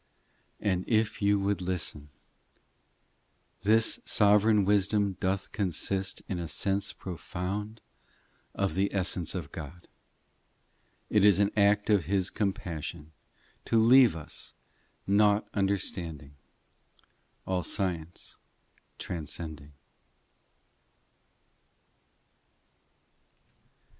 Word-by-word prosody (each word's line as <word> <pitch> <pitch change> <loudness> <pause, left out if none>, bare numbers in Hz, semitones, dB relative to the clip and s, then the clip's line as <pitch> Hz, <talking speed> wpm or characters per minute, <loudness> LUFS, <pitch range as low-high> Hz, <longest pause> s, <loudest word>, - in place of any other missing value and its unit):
VIII 105 - 0
And 90 0 -1
if 110 -2 +1
you 100 0 +3
would 100 0 -1
listen; 85 -5 -3 1.5
This 110 +3 +3
sovereign 105 0 +4
wisdom 100 0 +2
doth 95 +1 -2
consist 95 0 -1
In 90 - -3
a 85 - -4
sense 100 +4 0
profound 95 +4 -6 0.7
Of 100 -1 -1
the 100 +2 0
essence 90 -2 0
of 85 -6 -5
God: 85 +2 -9 1.2
It 105 -2 +4
is 100 -2 +6
an 100 0 +2
act 105 0 +3
of 100 -7 +3
His 95 +1 0
compassion, 85 -5 -4 0.5
To 115 - +2
leave 120 -2 +6
us, 80 -2 -7 0.5
nought 105 +1 +3
understanding, 90 -7 -2 1.1
All 95 -1 -1
science 85 -1 -3 0.6
transcending. 80 -3 -6
95 Hz, 90 wpm, -29 LUFS, 85-105 Hz, 1.5 s, is